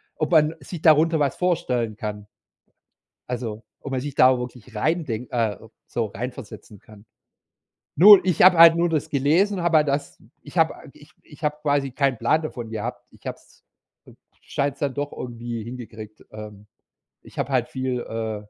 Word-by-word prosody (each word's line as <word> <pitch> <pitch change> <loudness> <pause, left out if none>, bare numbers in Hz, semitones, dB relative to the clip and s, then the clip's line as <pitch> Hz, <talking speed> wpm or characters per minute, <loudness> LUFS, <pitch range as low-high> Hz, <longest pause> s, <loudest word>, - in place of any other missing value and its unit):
ob 155 +3 -2
man 155 0 +4
sich 170 -4 -9
darunter 160 +1 +4
was 140 -2 0
vorstellen 125 -11 -1
kann. 105 -1 -6 1.0
Also 115 -3 -5 0.2
ob 140 - -8
man 130 - -1
sich 145 +1 -6
da 130 -1 +5
wirklich 125 -1 -9
reindenk 125 -2 -2
äh, 115 -4 -1 0.3
so 115 -2 -2
reinversetzen 110 -1 -8
kann. 105 -1 -17 0.9
Nur 200 +4 +9
ich 180 -4 +1
habe 185 -1 +7
halt 165 0 +9
nur 170 +1 +1
das 155 -3 -2
gelesen, 170 +8 +1
habe 170 -2 +3
halt 150 -1 +2
das 140 +1 -3 0.2
ich - - -11
habe - - +3 0.2
ich - - -18
ich 150 +1 -17
habe 150 0 -1
quasi 145 -2 0
keinen 135 -1 0
Plan 135 +8 +1
davon 125 -7 -6
gehabt. 115 +3 -5
Ich - - -22
habe - - -5
es - - -26 0.8
scheine 140 0 -2
es 140 - -26
dann 140 -3 -1
doch 145 0 -4
irgendwie 120 -2 -6
hingekriegt 110 -3 -10
ähm, 105 -1 -11 0.5
ich - - -18
habe - - -2
halt 125 -2 +1
viel, 130 -1 -3
äh 110 -1 -4
130 Hz, 170 wpm, -23 LUFS, 115-155 Hz, 1.0 s, Nur